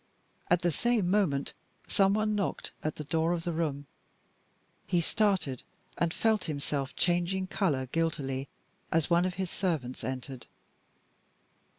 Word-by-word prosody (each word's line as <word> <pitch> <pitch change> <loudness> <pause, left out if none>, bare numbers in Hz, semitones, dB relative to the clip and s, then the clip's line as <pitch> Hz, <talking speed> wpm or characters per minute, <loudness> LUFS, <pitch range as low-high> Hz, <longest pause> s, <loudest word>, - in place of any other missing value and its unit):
At 175 0 +3
the 175 - +3
same 220 -1 +1
moment, 170 -10 +2 0.3
some 195 0 +4
one 215 0 +1
knocked 205 -2 -1
at 155 - -1
the 150 - -5
door 160 +3 +1
of 170 -1 -2
the 175 - -1
room. 150 -3 -1 1.0
He 175 - +3
started, 170 - +1 0.3
and 170 -1 +1
felt 220 +1 +2
himself 140 -3 -2
changing 175 +2 +1
color 185 -9 0
guiltily 135 -2 -1 0.4
as 165 0 +1
one 170 +1 +5
of 185 -1 -1
his 190 -2 -2
servants 155 -10 -2
entered. 130 -1 -5
170 Hz, 135 wpm, -30 LUFS, 145-190 Hz, 1.0 s, one